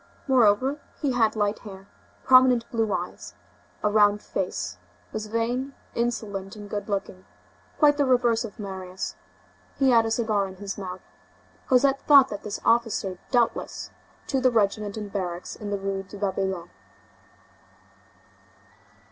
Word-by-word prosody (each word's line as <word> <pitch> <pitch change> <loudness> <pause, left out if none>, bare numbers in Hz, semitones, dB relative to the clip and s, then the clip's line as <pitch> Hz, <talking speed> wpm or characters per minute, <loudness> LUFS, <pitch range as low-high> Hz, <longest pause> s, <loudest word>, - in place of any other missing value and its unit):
Moreover, 255 +2 +3 0.2
he 285 -3 0
had 230 -3 +2
light 205 0 0
hair, 195 -2 -11 0.4
prominent 255 -2 +5
blue 225 -3 0
eyes, 90 - -4 0.5
a 210 - +3
round 205 -1 +4
face, 90 - -3 0.3
was 215 0 -4
vain, 245 +5 -2 0.2
insolent 210 -4 -3
and 205 -1 -9
good 205 +1 -5
looking; 195 - -3 0.5
quite 290 -1 +5
the 285 - +3
reverse 245 -3 +3
of 230 -1 -8
Marius. 190 -3 -6 0.6
He 270 -2 +4
had 230 -2 +5
a - - -1
cigar 220 -3 +1
in 190 - -10
his 200 +1 -5
mouth. 185 -2 -6 0.7
Cosette 270 +1 +3
thought 280 -3 +7
that 205 - -5
this 210 0 -5
officer 225 -5 +1
doubtless 240 -3 0
belonged - - -29
to 265 -2 +1
the 255 - +5
regiment 210 -1 0
in 210 -1 -5
barracks 180 -3 -4
in 210 - -7
the 200 - -1
Rue 195 0 -3
de 195 +2 -11
Babylone. 190 - -2
210 Hz, 145 wpm, -25 LUFS, 195-240 Hz, 0.7 s, thought